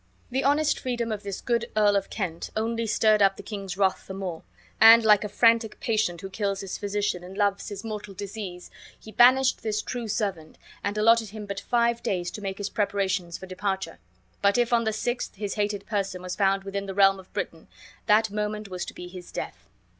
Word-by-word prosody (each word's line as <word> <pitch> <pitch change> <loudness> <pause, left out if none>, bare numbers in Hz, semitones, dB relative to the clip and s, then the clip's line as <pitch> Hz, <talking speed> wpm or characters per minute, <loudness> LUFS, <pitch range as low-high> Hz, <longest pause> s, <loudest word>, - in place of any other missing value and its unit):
The 265 +2 0
honest 295 +2 +2
freedom 240 -3 -2
of 210 -1 -3
this 200 -2 -5
good 235 -1 0
Earl 205 -1 +4
of 195 -1 0
Kent 170 -6 -4
only 230 +1 -1
stirred 215 0 +3
up 195 -1 +4
the - - -9
king's 195 -4 -6
wrath 195 -2 +1
the 190 - -6
more, 185 -4 -5 0.4
and, 225 0 +9
like 210 -2 +6
a 210 - -4
frantic 230 +1 +3
patient 215 -7 0
who 195 - -6
kills 200 0 -2
his 195 -2 -5
physician 205 -3 -2
and 185 +2 -10
loves 200 0 0
his 205 -1 -7
mortal 210 -3 -6
disease, 200 -3 -7 0.3
he 220 - -12
banished 255 +4 +5
this 215 -1 -1
true 245 -2 -4
servant, 195 -7 -3 0.3
and 205 +1 -2
allotted 225 0 +4
him 215 0 -8
but 200 -1 -4
five 235 0 +1
days 175 -2 -2
to 210 - -8
make 195 -1 -4
his 205 -1 -4
preparations 195 -4 -1
for - - -9
departure; 190 -2 -3 0.4
but 200 +1 +3
if 240 0 +2
on 230 -1 +3
the 220 - +1
sixth 240 +3 -3
his 200 0 -3
hated 205 -1 -2
person 195 -4 -2
was 180 0 -4
found 195 -1 +2
within 200 0 -4
the 195 - -5
realm 195 -1 +5
of 190 - -15
Britain, 165 -1 -5 0.4
that 215 0 +4
moment 210 0 -3
was 180 -1 -4
to - - -9
be 180 - -8
his 180 -1 -10
death. 95 - -7
205 Hz, 210 wpm, -26 LUFS, 195-220 Hz, 0.4 s, and